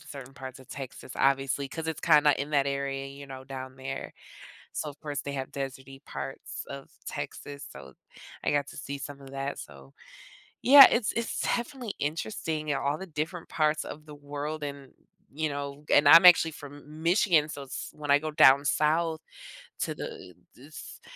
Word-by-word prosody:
certain 135 -2 -10
parts 130 -1 -8
of 130 - -16
Texas, 130 -2 -8
obviously, 135 0 +1
'cause 160 +4 -5
it's 160 - -3
kinda 150 -3 +5
in 140 +2 -3
that 140 -2 +2
area, 140 0 -2
you 140 +1 -10
know, 135 -1 -9
down 130 -1 -8
there. 135 +1 -6 0.6
So, 150 - -3
of 145 0 -13
course, 145 -2 -4
they 140 - -5
have 135 -1 -4
desert-y 135 0 -6
parts 135 - -6
of 140 0 -9
Texas, 140 0 -6
so - - -12 0.5
I - - +1
got 145 -1 +1
to - - -11
see 140 0 -6
some 140 0 -7
of 135 -1 -12
that, 135 +1 -4
so 70 -2 -12 0.7
yeah, 275 +1 +12
it's 235 -3 +1
it's 235 0 -2
definitely 240 -2 -2
interesting 155 0 -3
in 145 - +1
all 140 +2 0
the 190 - -7
different 160 +1 -4
parts 155 -1 +1
of 150 +1 -9
the 150 - -10
world 145 +1 -5
and, 140 -2 -8 0.4
you 155 +2 -2
know 140 0 -6
and, 145 0 +6
I'm 165 +4 +10
actually 165 -2 +8
from 145 -3 -10
M 150 +2 -12
Michigan, 170 -3 +3
so 140 -2 -7
it's 135 - -6
when 150 -1 -5
I 140 - +7
go 155 +1 -4
down 140 -2 +6
south 160 +2 +1 0.6
to - - -1
the 465 -2 -8 0.2
this - - -11
145 Hz, 185 wpm, -28 LUFS, 135-155 Hz, 0.7 s, yeah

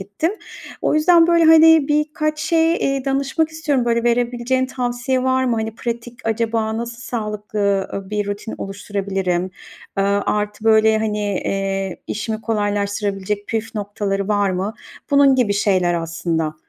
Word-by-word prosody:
ettim. 205 - -2 0.5
O - - +1
yüzden, 330 +2 +5
böyle, 340 -1 +4
hani, 320 -2 +7
birkaç 305 +1 0
şey, 325 0 +2
eee, 275 -5 -1
danışmak 275 +4 0
istiyorum. 295 -5 -1
Böyle, 235 -1 +1
verebileceğin 245 +2 +1
tavsiye 250 0 -2
var 260 0 +1
mı? 240 -3 +1
Hani, 220 0 -3
pratik 235 0 -5
acaba 225 0 0
nasıl 235 0 -5
sağlıklı, 210 -3 -2
ııı, 195 0 -6
bir 210 -1 -1
rutin 205 +2 -5
oluşturabilirim? 195 -2 -2 0.5
Aaa, 200 +1 +2
artı, 210 0 -2
böyle, 220 0 +5
hani, 215 -1 -1 0.3
eee, 195 -1 -2
işimi 220 +1 -3
kolaylaştırabilecek 205 -2 -2
püf 225 +1 -3
noktaları 200 -1 -2
var 205 -2 +2
mı? 190 +4 -2 0.4
Bunun 280 -1 +5
gibi 240 -6 +2
şeyler 185 -3 +2
aslında. 165 -1 -2
220 Hz, 140 wpm, -20 LUFS, 200-260 Hz, 0.5 s, hani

